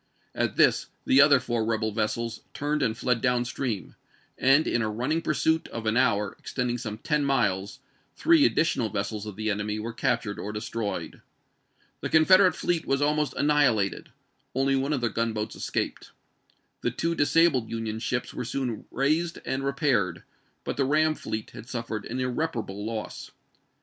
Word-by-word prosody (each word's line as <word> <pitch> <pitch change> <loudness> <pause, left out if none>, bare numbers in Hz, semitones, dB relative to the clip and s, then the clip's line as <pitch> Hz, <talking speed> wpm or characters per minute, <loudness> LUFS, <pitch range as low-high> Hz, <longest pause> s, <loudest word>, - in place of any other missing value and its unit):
At - - -1
this - - +4 0.2
the 135 - +6
other 140 -1 +6
four 120 -2 -1
rebel 110 -1 0
vessels 110 +1 -2
turned 150 +1 -1
and 115 -4 0
fled 125 -2 0
down 125 -1 +2
stream, 120 -4 -3 0.4
and 135 +4 +4
in 120 - +1
a 110 - 0
running 130 +10 -1
pursuit 160 +1 +1
of 115 -1 -6
an 110 0 +1
hour, 110 -5 +2
extending 125 -1 -2
some 110 -3 -5
ten 150 +5 0
miles, 105 -8 0 0.3
three 330 -3 +4
additional 135 - +2
vessels 100 +2 -3
of 105 - -7
the 110 +1 -1
enemy 105 +1 -2
were 115 +2 -4
captured 115 -3 -1
or 105 - -4
destroyed. 105 0 -4 0.8
The - - -4
Confederate 185 +4 +6
fleet 170 -2 -1
was 135 - +2
almost 150 -1 +1
annihilated; 140 -9 +2 0.5
only 135 +1 +2
one 135 +2 0
of 135 - -1
their 120 - +1
gunboats 110 -1 -2
escaped. - - -3 0.7
The - - +1
two 165 +1 -1
disabled 145 -5 +3
Union 110 -1 -3
ships 120 +1 -2
were 125 - -4
soon 125 -2 -3
raised 155 +6 0
and 135 +1 -2
repaired, 130 - 0 0.4
but - - -4
the 140 - +2
ram 155 +3 +3
fleet 110 -7 -5
had 120 - -11
suffered 115 -3 -4
an 125 +3 -4
irreparable 125 -6 -2
loss. 110 0 -5
125 Hz, 165 wpm, -27 LUFS, 110-145 Hz, 0.8 s, the